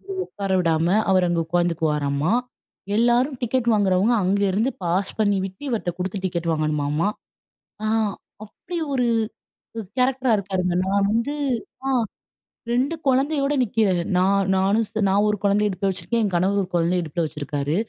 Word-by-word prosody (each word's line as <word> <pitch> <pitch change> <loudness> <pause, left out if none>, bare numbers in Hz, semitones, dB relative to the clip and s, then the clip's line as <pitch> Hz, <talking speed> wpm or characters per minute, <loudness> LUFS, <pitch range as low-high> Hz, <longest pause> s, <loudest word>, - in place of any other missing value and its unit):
வந்து 390 0 -7
உட்கார 195 -1 -4
விடாம 165 0 +1 0.2
அவர் 185 -1 +4
அங்க 170 -1 0
உட்காந்துக்குவாராமா. 160 -2 0 0.6
எல்லாரும் 245 +3 +2
டிக்கெட் 245 0 0
வாங்குறவங்க, 200 +2 +3
அங்கேருந்து 200 +5 +1
பாஸ் 180 +3 0
பண்ணி 205 -2 +3
விட்டு 190 +8 -12
இவர்ட்ட 210 -6 -1
குடுத்து 190 +1 -3
டிக்கெட் 170 -2 -2
வாங்கணுமாமா. 155 +3 0 0.8
ஆ. - - 0 0.6
அப்படி 345 - -9 0.2
ஒரு 250 -2 +1 0.9
கேரக்டரா 255 0 +2
இருக்காருங்க. 185 -3 -1
நான் 200 +1 +2
வந்து. 235 +6 0 0.5
ஆ - - +1 0.8
2 265 +7 +1
குழந்தையோட 275 +2 +2
நிக்கிறேன். 205 -6 +1
நான் 195 +1 +2
நானும், 195 +4 +2 0.2
நான் 200 +2 +3
ஒரு 210 - 0
குழந்தை 200 +1 +3
இடுப்புல 195 0 -1
வச்சுருக்கேன். 230 +5 -2
என் 205 - 0
கணவர் 190 +3 +2
ஒரு 180 - -5
குழந்தைய 175 +1 +1
இடுப்புல 165 +1 -2
வச்சுருக்காரு. 145 0 -3
195 Hz, 140 wpm, -23 LUFS, 175-230 Hz, 0.9 s, அவர்